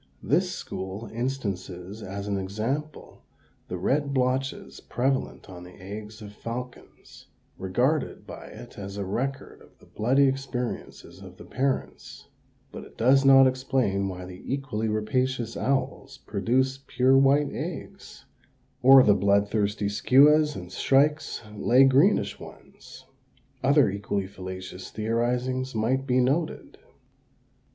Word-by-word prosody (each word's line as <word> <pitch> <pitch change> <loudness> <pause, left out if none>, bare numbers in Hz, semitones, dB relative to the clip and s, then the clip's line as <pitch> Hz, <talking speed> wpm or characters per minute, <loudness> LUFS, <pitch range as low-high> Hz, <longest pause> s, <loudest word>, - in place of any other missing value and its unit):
This - - +1
school 95 +3 -6
instances 100 -6 -4
as 100 0 -6
an 100 - -1
example 115 +11 -4 0.5
the - - -4
red 140 0 0
blotches 130 +1 -1
prevalent 130 +2 -2
on 90 -2 -10
the 90 +1 -14
eggs 105 +3 -9
of 105 0 -10
falcons, 120 +3 -9 0.3
regarded 125 +11 -1
by - - -10
it - - -12
as 100 0 -7
a 100 - -3
record 130 +8 -4
of - - -20
the - - -20
bloody 135 +6 +2
experiences 130 -2 -5
of - - -12
the - - -12
parents; 135 +1 -3 0.4
but - - -8
it - - -16
does 135 +4 +4
not 135 -1 +7
explain 130 -6 0
why 90 -1 -7
the 90 0 -11
equally 135 -6 -2
rapacious 115 +2 -1
owls 135 0 -2
produce 130 +6 0
pure 130 +1 +3
white 140 +2 +4
eggs, - - -7 0.6
or 135 +1 +8
the 105 - +5
blood 100 +1 +2
thirsty 105 -1 0
skuas 150 +8 +4
and 90 0 -8
shrikes 145 +6 +1
lay 125 +5 +4
greenish 135 +10 +3
ones. - - -14 0.6
Other 140 0 +5
equally 100 -1 -3
fallacious 95 -1 -8
theorizings 125 +3 -1
might 130 +5 0
be 125 0 +2
noted. 145 +6 -1
125 Hz, 130 wpm, -26 LUFS, 100-135 Hz, 0.6 s, or